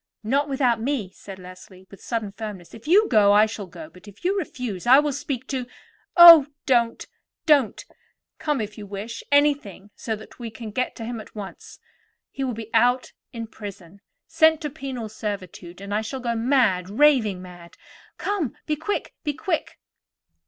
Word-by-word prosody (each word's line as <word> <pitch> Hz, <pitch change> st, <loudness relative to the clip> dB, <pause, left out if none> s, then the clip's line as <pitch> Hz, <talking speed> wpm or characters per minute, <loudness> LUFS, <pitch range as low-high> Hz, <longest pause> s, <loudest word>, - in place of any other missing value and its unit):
"Not 280 Hz, +6 st, 0 dB
without 250 Hz, -4 st, +1 dB
me," 235 Hz, -7 st, -2 dB
said 195 Hz, 0 st, -11 dB
Leslie 185 Hz, 0 st, -13 dB
with 195 Hz, -, -14 dB
sudden 225 Hz, -4 st, -3 dB
firmness. 200 Hz, -5 st, -8 dB
"If 225 Hz, +5 st, -12 dB
you 405 Hz, +6 st, +5 dB
go, 205 Hz, -4 st, +5 dB
I 210 Hz, +1 st, +6 dB
shall 210 Hz, -3 st, -6 dB
go; 310 Hz, -, -10 dB
but 185 Hz, -6 st, -18 dB
if 205 Hz, -, -15 dB
you 385 Hz, +2 st, +2 dB
refuse, 250 Hz, -, -4 dB
I 260 Hz, +2 st, +8 dB
will 295 Hz, 0 st, +2 dB
speak 260 Hz, -2 st, -4 dB
to——" 255 Hz, -3 st, -3 dB, 0.5 s
"Oh, 335 Hz, -4 st, +11 dB, 0.2 s
don't! 235 Hz, -3 st, +1 dB, 0.4 s
don't! 285 Hz, -, +3 dB, 0.5 s
come 300 Hz, -3 st, -1 dB
if 210 Hz, +1 st, -6 dB
you 205 Hz, -, -8 dB
wish; 210 Hz, +4 st, -6 dB
anything, 285 Hz, -9 st, +1 dB
so 220 Hz, -, -3 dB
that 215 Hz, +3 st, -14 dB
we 235 Hz, -2 st, -5 dB
get 225 Hz, +2 st, -4 dB
to 225 Hz, -, -7 dB
him 230 Hz, -1 st, -5 dB
at -, -, -16 dB
once. 200 Hz, -2 st, -9 dB, 0.5 s
He 275 Hz, -, -4 dB
will 250 Hz, -3 st, -2 dB
be 225 Hz, 0 st, -8 dB
put 245 Hz, +2 st, +2 dB, 0.2 s
in 230 Hz, -1 st, -6 dB
prison, 200 Hz, -4 st, -11 dB, 0.2 s
sent 320 Hz, -1 st, +4 dB
to 300 Hz, -3 st, -4 dB
penal 260 Hz, -5 st, -6 dB
servitude; 195 Hz, -4 st, -7 dB
and 200 Hz, +1 st, -6 dB
I 210 Hz, -, +1 dB
shall 260 Hz, +5 st, -5 dB
go 240 Hz, -2 st, -2 dB
mad, 225 Hz, -7 st, +2 dB
raving 225 Hz, -5 st, +3 dB
mad. 175 Hz, -2 st, -13 dB, 0.4 s
Come; 390 Hz, -, -2 dB
be 305 Hz, -, 0 dB
quick, 320 Hz, +7 st, -3 dB
be 295 Hz, -2 st, -1 dB
quick!" 330 Hz, -1 st, -3 dB
230 Hz, 175 wpm, -24 LUFS, 205-275 Hz, 0.5 s, Oh